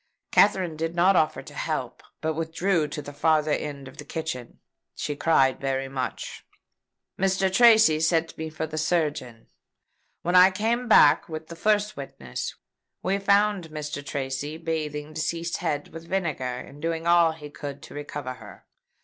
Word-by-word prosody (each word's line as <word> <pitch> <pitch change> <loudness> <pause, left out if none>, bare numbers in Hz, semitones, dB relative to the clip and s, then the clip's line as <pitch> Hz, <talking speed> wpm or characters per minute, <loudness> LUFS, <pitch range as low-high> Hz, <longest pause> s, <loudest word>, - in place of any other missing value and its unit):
Katherine 190 -5 +3
did 165 +2 -3
not 185 +3 +4
offer 155 -2 +1
to - - -12
help, - - -3 0.2
but 160 0 0
withdrew 165 +1 0
to 150 0 -6
the 145 - -9
farther 155 +1 +2
end 140 -2 -3
of - - -13
the - - -7
kitchen. 155 -7 -5 0.4
She 145 - -3
cried 135 -4 +3
very 135 -1 -1
much. 130 -1 -5 0.8
Mr. 190 0 +1
Tracy 220 -8 +6
sent 165 0 +1
me 160 0 -5
for 155 - -5
a 155 0 -4
surgeon. 150 -8 -1 0.8
When 175 +1 0
I 180 +1 +9
came 225 +6 -1
back 150 -10 +6
with 155 0 -7
the 170 - -7
first 210 +3 +1
witness, 65 - -6 0.5
we 195 +2 +1
found 200 -3 +2
Mr. 150 -2 -5
Tracy 140 +2 -4
bathing 155 -2 -4
deceased's 165 +2 -2
head 145 -1 -2
with 165 +1 -10
vinegar, 170 -9 -1
and 140 +3 -10
doing 165 0 -2
all 170 -1 +5
he 150 -2 -10
could 145 -1 -7
to - - -11
recover 145 -2 -5
her. 110 -4 -14
160 Hz, 160 wpm, -26 LUFS, 145-175 Hz, 0.8 s, I